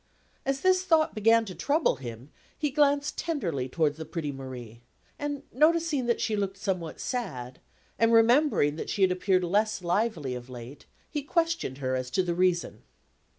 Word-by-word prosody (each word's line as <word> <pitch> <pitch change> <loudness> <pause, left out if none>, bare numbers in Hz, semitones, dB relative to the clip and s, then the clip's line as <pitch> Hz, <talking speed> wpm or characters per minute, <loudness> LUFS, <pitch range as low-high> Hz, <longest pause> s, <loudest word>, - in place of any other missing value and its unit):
As 275 0 0
this 370 0 +4
thought 325 -4 +3
began 225 +1 +4
to 190 - -7
trouble 300 - +1
him, 120 +2 -9 0.3
he 295 -3 -1
glanced 285 0 +2
tenderly 170 - -2
towards 150 +1 0
the 160 - -5
pretty 160 -3 -4
Marie; 125 -4 -9 0.4
and 290 -1 -3
noticing 310 -2 +2
that 235 - +1
she 220 -1 0
looked 200 -1 -2
somewhat 185 -5 -3
sad, 130 - -4 0.4
and 230 0 +4
remembering 230 - +4
that - - -5
she 200 - +1
had 185 - +4
appeared 185 0 +1
less 205 +2 +1
lively 175 - 0
of 125 0 -7
late, 125 +2 -10 0.2
he 295 - -2
questioned 330 - -1
her 130 -2 -1
as 130 -1 -3
to 185 +9 +1
the 175 -1 -1
reason. 180 0 0
195 Hz, 170 wpm, -28 LUFS, -, 0.4 s, this